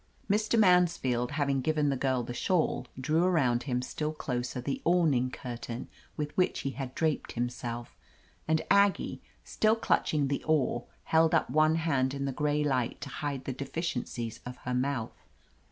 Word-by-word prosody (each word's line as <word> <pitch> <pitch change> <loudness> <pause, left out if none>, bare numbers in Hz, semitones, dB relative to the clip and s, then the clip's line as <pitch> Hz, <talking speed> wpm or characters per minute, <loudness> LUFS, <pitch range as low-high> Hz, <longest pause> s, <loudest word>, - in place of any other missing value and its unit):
Mr. 215 +3 +2
Mansfield, 170 - +3
having 140 -2 +1
given 150 +1 +1
the 140 - +1
girl 130 -1 0
the 120 - -5
shawl, 160 -4 0
drew 155 +5 +2
arotmd 135 -10 +2
him 125 0 -1
still 150 +4 -3
closer 125 -4 -3
the 135 +2 -3
awning 155 -8 +3
curtain 120 -1 -6 0.3
with 150 -1 -3
which 185 - +1
he 135 - -2
had 130 -2 -6
draped 160 -2 -1
himself, 120 0 -4 0.5
and 160 0 +2
Aggie, 200 0 +3 0.2
still 220 0 +2
clutch 225 - +1
ing 145 -3 +1
the 140 0 -2
oar, 145 -6 +1 0.2
held 160 0 +3
up - - +1
one 155 +1 +4
hand 140 -5 +1
in 140 0 -2
the 135 - -1
gray 150 +2 0
light 130 -5 0
to - - -5
hide 145 -3 -4
the 135 - -2
deficiences 125 -5 -4
of 125 0 -7
her 125 - -1
mouth. 125 -2 -2
140 Hz, 170 wpm, -30 LUFS, 125-160 Hz, 0.5 s, one